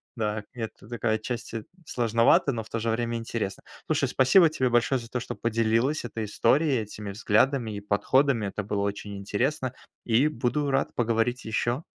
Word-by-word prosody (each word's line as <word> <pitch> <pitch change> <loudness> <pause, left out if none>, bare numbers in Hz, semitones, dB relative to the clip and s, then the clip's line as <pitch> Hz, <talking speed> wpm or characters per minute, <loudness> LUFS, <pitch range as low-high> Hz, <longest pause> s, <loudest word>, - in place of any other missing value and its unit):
Да, 105 -2 -2
это 115 -3 -7
такая 115 -2 0
отчасти 115 0 -5 0.2
сложновато, 115 +2 +3
но 115 -3 -3
в - - -15
то 115 - -2
же 115 +1 -1
время 115 +1 -1
интересно. 115 -4 -4 0.2
Слушай, - - +1
спасибо 160 +6 +5
тебе 130 -5 0
большое 120 +2 +2
за 115 - -10
то, 125 +1 -3
что - - -5
поделилась 115 +5 +1
этой 115 -2 -4
историей, 130 +5 +2
этими 105 -1 -7
взглядами 115 +4 +2
и - - -4
подходами. 115 +4 +2
Это 100 +2 -4
было 100 0 -2
очень 100 0 -3
интересно. 125 +7 -1 0.3
И 120 +5 +3
буду 145 0 -1
рад 135 0 0
поговорить 120 +1 0
ещё. 120 +5 -1
115 Hz, 170 wpm, -27 LUFS, 110-130 Hz, 0.3 s, спасибо